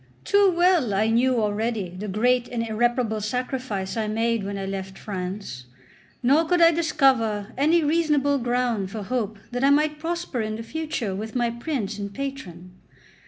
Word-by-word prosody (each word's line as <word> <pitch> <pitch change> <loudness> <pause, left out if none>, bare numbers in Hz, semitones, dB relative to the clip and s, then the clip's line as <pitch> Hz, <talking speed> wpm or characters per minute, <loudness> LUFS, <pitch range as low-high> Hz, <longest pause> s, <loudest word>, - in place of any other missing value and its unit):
Too 405 -1 +4
well 345 - +3
I 215 +3 +2
knew 245 +1 +3
already 215 -2 -1
the 185 +4 -7
great 245 +5 +2
and 230 -1 -3
irreparable 230 0 0
sacrifice 245 -3 -3
I 220 -2 -1
made 225 0 0
when 200 0 -4
I 195 - -4
left 195 0 -5
France; 185 -9 -6 0.6
nor 280 +6 +4
could 355 +1 +2
I 335 0 +7
discover 260 -10 +1
any 315 +5 +3
reasonable 295 -3 +2
ground 240 -5 0
for 210 +1 -5
hope 220 -1 -2
that 245 +1 -2
I 275 - +5
might 300 +1 +2
prosper 335 -6 -3
in 215 0 -3
the 225 - -6
future 285 -7 -3
with 215 +4 -6
my 240 -1 +1
prince 235 -5 -3
and 200 0 -4
patron. 200 -9 -6
235 Hz, 165 wpm, -24 LUFS, 205-275 Hz, 0.6 s, I